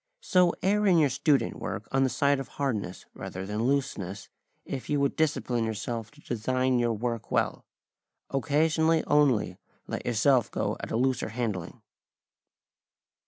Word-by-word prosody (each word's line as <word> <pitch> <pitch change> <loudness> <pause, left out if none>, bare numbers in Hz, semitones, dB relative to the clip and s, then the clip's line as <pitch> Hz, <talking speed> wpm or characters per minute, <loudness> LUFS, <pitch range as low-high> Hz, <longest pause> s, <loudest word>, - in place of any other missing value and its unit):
So 180 -2 +3
err 205 +2 +3
in 180 -3 +5
your 150 -4 +4
student 140 -6 +1
work 100 +1 -5
on 135 - +2
the 130 - +2
side 140 +1 +2
of 135 - -5
hardness 110 -10 -2
rather 95 +1 -6
than 105 +3 -2
looseness, 105 -9 -2 0.4
if 135 -2 -5
you 145 - +2
would 140 -1 +1
discipline 130 -6 0
yourself 110 +1 -3
to 150 0 -20
design 130 +2 0
your 120 -1 +1
work 115 +1 -3
well. - - 0 0.6
Occasionally 160 +3 +2
only 130 -11 +2 0.3
let - - -4
yourself 120 +1 +3
go - - -1
at - - -6
a - - -1
looser 130 -1 +1
handling. 110 -7 -4
130 Hz, 150 wpm, -28 LUFS, 110-145 Hz, 0.6 s, in